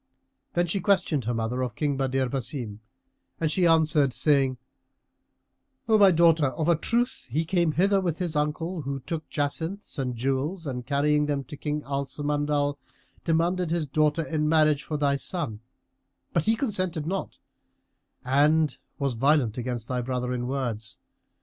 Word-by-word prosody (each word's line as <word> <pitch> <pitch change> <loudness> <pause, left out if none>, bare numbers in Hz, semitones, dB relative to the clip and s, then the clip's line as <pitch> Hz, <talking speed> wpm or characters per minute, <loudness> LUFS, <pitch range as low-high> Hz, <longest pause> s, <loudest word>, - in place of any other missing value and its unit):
Then 175 0 +2
she 175 +4 -1
questioned 175 - +1
her 120 - 0
mother 115 +3 -1
of 125 -4 -3
King 145 -2 0
Badr 135 -1 0
Basim, 125 -5 -4 0.6
and 160 -2 0
she 175 +1 +3
answered, 155 -4 +3
saying, 135 -4 +2 1.3
"O 220 -1 +4
my 200 -1 +8
daughter, 165 -3 +4
of 155 +4 -2
a 170 - +5
truth 240 +10 -1
he 155 +7 0
came 170 -2 +1
hither 195 +4 +3
with 170 -4 -1
his 175 -4 -3
uncle, 155 +4 -1
who 140 -1 -4
took 160 +4 -5
jacinths 160 +5 -3
and 125 -2 -2
jewels 135 +8 -1
and 125 -3 -5
carrying 150 +1 +2
them 140 -2 -1
to 150 - -9
King 150 0 -3
Al 140 0 -2
Samandal, 145 0 -1 0.4
demanded 170 +2 +1
his 165 -1 0
daughter 150 +3 +1
in 150 -2 0
marriage 155 -2 +4
for 150 0 -4
thy 140 -1 +2
son 140 - -4 0.7
but 170 - +1
he 225 - +3
consented 185 - -1
not 190 +4 -3 0.9
and 150 +4 +3 0.2
was 140 -2 0
violent 130 -2 +2
against 120 -2 -3
thy 125 -1 -1
brother 125 0 -2
in 125 0 -2
words. 120 -5 -3
150 Hz, 160 wpm, -26 LUFS, 135-165 Hz, 1.3 s, my